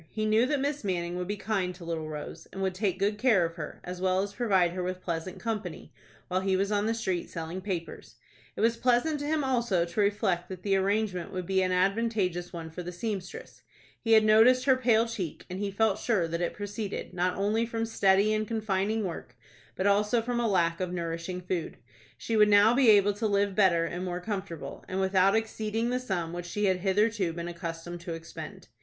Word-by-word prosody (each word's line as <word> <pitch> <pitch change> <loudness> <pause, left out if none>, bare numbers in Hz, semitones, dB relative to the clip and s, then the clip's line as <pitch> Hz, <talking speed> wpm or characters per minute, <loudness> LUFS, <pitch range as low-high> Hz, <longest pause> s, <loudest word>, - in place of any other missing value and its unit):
He 215 -1 -2
knew 220 +3 +3
that 290 0 0
Miss 285 0 -2
Manning 175 -3 -2
would 180 0 -3
be 205 +1 -3
kind 195 -4 -1
to 175 -1 -11
little 160 -2 -3
Rose, 155 +2 -7
and 195 - -4
would 190 -1 0
take 190 -1 -1
good 205 +2 0
care 220 -8 +4
of 165 - -4
her, 160 -3 -7
as 180 0 -6
well 185 0 +2
as 200 0 -6
provide 195 -7 +2
her 180 +1 -4
with 185 0 -3
pleasant 170 +1 -4
company, 215 -7 -5 0.3
while 185 +1 0
he 190 0 +1
was 200 +2 0
on 205 0 +1
the 225 - +1
street 190 -6 -2
selling 165 +3 -5
papers. 185 -4 -5 0.4
It - - -4
was 230 +1 +3
pleasant 255 +6 +2
to 290 - -4
him 310 -1 +1
also 235 -9 +1
to 170 +5 -5
reflect 200 -3 0
that 185 -1 -8
the 195 -1 +2
arrangement 195 -2 0
would 185 -1 -4
be 190 +1 +1
an 185 0 +1
advantageous 190 -2 0
one 165 -2 -7
for 180 - -6
the 175 0 -6
seamstress. 190 0 -6 0.4
He 225 -1 +2
had 220 -1 +6
noticed 235 +4 +6
her 265 -2 +5
pale 235 -3 +3
cheek, 190 -9 -5
and 185 - -4
he 205 0 -1
felt 205 +1 +1
sure 200 -8 +1
that 170 +1 -3
it 175 - -1
proceeded, 205 0 -5
not 180 0 0
only 215 +4 +1
from 225 -1 -2
steady 205 -1 +3
and 215 0 -1
confining 215 -1 -1
work, 165 -9 -6 0.4
but 185 - -2
also 210 +3 +3
from 240 0 -1
a 235 -2 +1
lack 170 -4 +2
of 185 -1 -2
nourishing 170 +1 -4
food. 180 -2 -3 0.4
She 230 - -2
would 210 -1 +6
now 205 +2 +6
be 255 -2 +5
able 205 -1 +6
to 215 +2 -1
live 200 -1 +1
better 185 -5 +3
and 175 +2 -4
more 180 -1 -3
comfortable, 180 -8 -5
and 185 - -3
without 190 +1 +3
exceeding 225 +1 -1
the 250 - 0
sum 180 -9 -3
which 175 0 -5
she 210 +4 -1
had 190 -2 +3
hitherto 195 -1 +1
been 170 0 -5
accustomed 170 0 -6
to 170 -2 -5
expend. 165 0 -9
195 Hz, 220 wpm, -28 LUFS, 180-220 Hz, 0.4 s, had